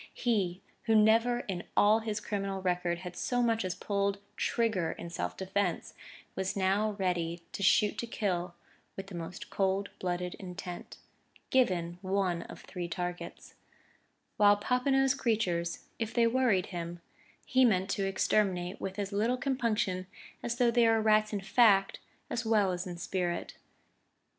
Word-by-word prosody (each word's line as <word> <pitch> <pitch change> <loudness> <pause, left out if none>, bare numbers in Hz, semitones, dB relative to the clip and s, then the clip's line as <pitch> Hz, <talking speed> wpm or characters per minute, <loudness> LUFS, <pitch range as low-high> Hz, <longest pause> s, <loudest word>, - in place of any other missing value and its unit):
He 195 -7 0 0.2
who 225 -2 +3
never 225 +3 +4
in 185 -6 -4 0.2
all 210 +2 +6
his 220 -1 -3
criminal 195 -2 -3
record 180 -2 0
had 180 0 -6
so 245 +5 0
much 225 -2 +1
as 185 -1 -2
pulled 200 +1 -1 0.2
trigger 220 -9 0
in 170 - -8
self - - -3
defence, 190 -2 -1 0.4
was 190 0 -2
ready 190 -4 0
now - - -23
to - - -6
shoot 205 +2 +3
to 235 - -3
kill 180 -6 -2 0.4
with 195 - -6
the 195 - -11
most 170 +1 -7
cold 195 +1 0
blooded 180 -1 -2
intent 180 -2 -7 0.5
given 180 -9 +1
one 190 -3 0
of - - -10
three 180 -2 -6
targets; 175 0 -5 0.8
while 205 -1 +6
Popinot's 265 +4 +2
creatures, 200 -10 -1
if 225 -1 -3
they 235 -1 +5
worried 230 -6 +2
him, 170 0 -5 0.5
he 260 +1 +3
meant 190 -6 +3
to 195 -1 0
exterminate 190 -1 0
with 195 +1 -4
as 200 -1 -3
little 225 +5 +1
compunction 225 -8 -1 0.3
as 235 0 -2
though 240 -1 +3
they 235 -1 +4
were 225 0 +4
rats 215 0 +3
in 205 -2 -2
fact 195 -2 +4 0.3
as 235 - -2
well 215 -4 +3
as 180 0 -3
in 175 -1 -6
spirit.... 175 0 -2
195 Hz, 155 wpm, -31 LUFS, 180-225 Hz, 0.8 s, all